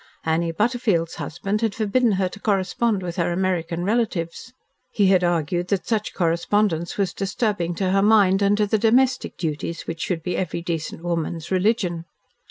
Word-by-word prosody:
Annie 165 +1 +1
Butterfield's 210 -4 0
husband 195 +6 -3
had 225 -3 0
forbidden 225 +1 +2
her 190 -1 +1
to 200 - -11
correspond 205 +1 0
with 175 0 -5
her 175 0 +1
American 175 -2 -1
relatives. 200 -2 -1 0.4
He 205 - +1
had 185 -2 +4
argued 175 0 0
that 185 -2 -1
such 215 -2 -2
correspondence 170 0 0
was 200 -2 0
disturbing 195 -3 -1
to 185 +1 0
her 195 +1 +3
mind, 205 -2 +4
and 200 +1 +3
to 210 - +3
the 215 +1 +1
domestic 250 +4 +2
duties 165 +1 -3
which 165 0 -5
should 165 -4 -2
be 180 0 -2
every 170 -2 -3
decent 165 -1 -4
woman's 170 0 -3
religion. 185 -3 +1
185 Hz, 170 wpm, -23 LUFS, 170-210 Hz, 0.4 s, had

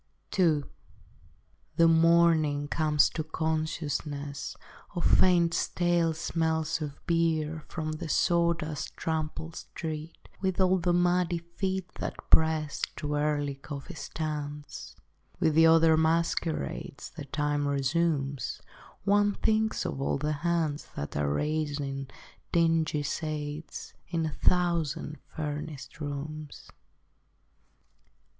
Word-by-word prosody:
II 155 -5 +4 1.1
The 165 0 +6
morning 165 -3 +4
comes 150 -1 +3
to 155 - -2
consciousness 155 -3 -3 0.4
Of 175 - -2
faint 175 -2 +5
stale 170 -3 +1
smells 160 0 0
of 145 -2 -5
beer 160 -2 +1
From 155 -2 -3
the 155 0 -5
sawdust 170 -3 +1
trampled 160 0 -3
street 160 0 -6
With 190 -1 0
all 185 0 +4
its 175 - -4
muddy 175 0 +3
feet 185 +2 -3
that - - -3 0.2
press 160 -2 +3
To 150 0 -3
early 145 -1 0
coffee 140 0 -8
stands. 150 -2 -5 0.4
With 160 - +3
the 165 +1 +7
other 160 0 +6
masquerades 160 - -1
That 140 -2 -9
time 145 0 0
resumes, 140 -1 0 0.4
One 205 +1 +3
thinks 220 0 +1
of 135 - -3
all 140 - +1
the 150 +2 -1
hands 165 -4 0
That 70 - -5
are 75 -1 +1
raising 145 - -2 0.4
dingy 165 -3 +2
shades 150 +1 -4
In 165 -2 -1
a 155 - -3
thousand 170 -4 +1
furnished 150 -1 -5
rooms. 150 +1 -6
155 Hz, 110 wpm, -29 LUFS, 145-170 Hz, 1.1 s, the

